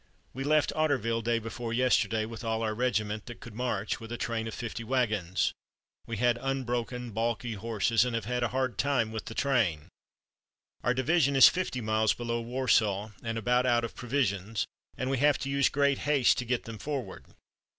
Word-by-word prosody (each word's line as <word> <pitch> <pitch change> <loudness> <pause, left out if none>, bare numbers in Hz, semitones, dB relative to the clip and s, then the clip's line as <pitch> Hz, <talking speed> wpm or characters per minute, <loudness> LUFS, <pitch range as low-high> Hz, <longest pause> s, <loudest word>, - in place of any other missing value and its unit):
"We 135 - -4
left 150 +1 +2
Otterville 130 -7 +1
day 120 +1 +1
before 115 +1 -5
yesterday 115 -3 +2
with 115 0 -8
all 110 0 -1
our 110 -1 0
regiment 110 -3 -1
that 120 - -8
could 115 - -10
march, 110 -3 -2
with 115 0 -9
a 120 - -3
train 115 -1 -2
of 110 - -5
fifty 120 -1 -5
wagons. 110 -8 0 0.5
We 115 -1 -4
had 120 +1 +2
unbroken, 125 -2 -2
balky 115 +2 -1
horses, 110 +1 +1
and 125 -2 -2
have 115 -3 -2
had 125 +2 -1
a 120 - +2
hard 130 -4 -2
time 135 -6 +1
with 110 -1 -5
the 115 - -7
train. 110 - +1 0.9
Our 125 +2 +2
division 140 +1 +2
is 135 - +10
fifty 180 -9 -2
miles 110 0 +2
below 120 -1 -2
Warsaw, 115 -4 +1
and 115 0 -3
about 125 +3 +2
out 120 -1 +3
of 115 - -4
provisions, 115 -5 -1 0.3
and 130 +1 -2
we 135 - 0
have 145 0 +4
to 135 - -4
use 140 -1 +3
great 140 -1 +2
haste 140 -3 +3
to 125 - -3
get 120 0 -1
them 115 -2 -8
forward. 135 -10 -4
120 Hz, 190 wpm, -29 LUFS, 110-130 Hz, 0.9 s, is